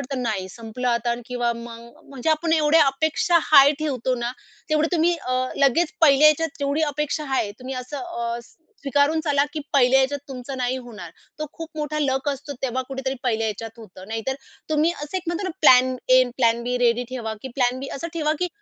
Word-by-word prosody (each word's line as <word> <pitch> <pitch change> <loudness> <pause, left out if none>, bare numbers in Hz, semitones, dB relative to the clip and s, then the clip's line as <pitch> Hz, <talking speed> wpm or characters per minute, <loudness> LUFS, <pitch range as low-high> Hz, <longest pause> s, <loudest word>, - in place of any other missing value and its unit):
वाटतं 255 0 -4
नाही, 200 -5 -2
संपलं 230 +4 -5
आता 235 0 +1
किंवा 245 -1 -1
मग 235 0 -11
म्हणजे 275 +3 -2
आपण 320 +1 +1
एवढ्या 310 0 +5
अपेक्षा 315 +5 +2
हाय 280 -2 +7
ठेवतो 260 -4 -1
ना, 240 0 -3 0.4
तेवढे 310 +1 +2
तुम्ही 340 +1 +2
अ, 255 - -4 0.2
लगेच 285 +5 +2
पहिल्या 300 -2 +6
ह्याच्यात 320 +2 +4
तेवढी 285 +3 0
अपेक्षा 300 +1 -2
आहे, 210 - 0
तुम्ही 260 +1 -6
असं 255 +3 -6
अ, 235 -9 -4
स - - -22 0.3
स्वीकारून 285 +3 +2
चला 285 -2 +2
की 310 - -4
पहिल्या 265 -1 +5
ह्याच्यात 275 +1 0
तुमचं 265 +1 -6
नाही 255 0 -1
होणार. 215 -9 -10 0.3
तो 305 - -3
खूप 325 -1 -8
मोठा 305 0 -2
लक 270 -1 0
असतो. 285 +1 -4
तेव्हा 260 0 -1
कुठेतरी 265 0 -3
पहिल्या 225 -3 0
ह्याच्यात 220 +1 -4
होतं. 190 -3 -12
नाहीतर 225 +4 -3 0.4
तुम्ही 310 +3 +2
असं 295 +3 -6
एक 370 - -3
म्हणतो 345 +3 -2
ना 370 - -2
plan 255 -3 +6
A, 255 0 +7
an 245 - -6
plan 235 -2 +2
be 250 +1 -1
ready 240 0 +2
ठेवा, 235 -4 -4
की 265 - -5
प्लॅन 250 -1 +1
बी 275 - -5
असं 335 +5 -5
ठेवा 305 -2 +1
की 360 0 0
265 Hz, 205 wpm, -23 LUFS, 240-305 Hz, 0.4 s, हाय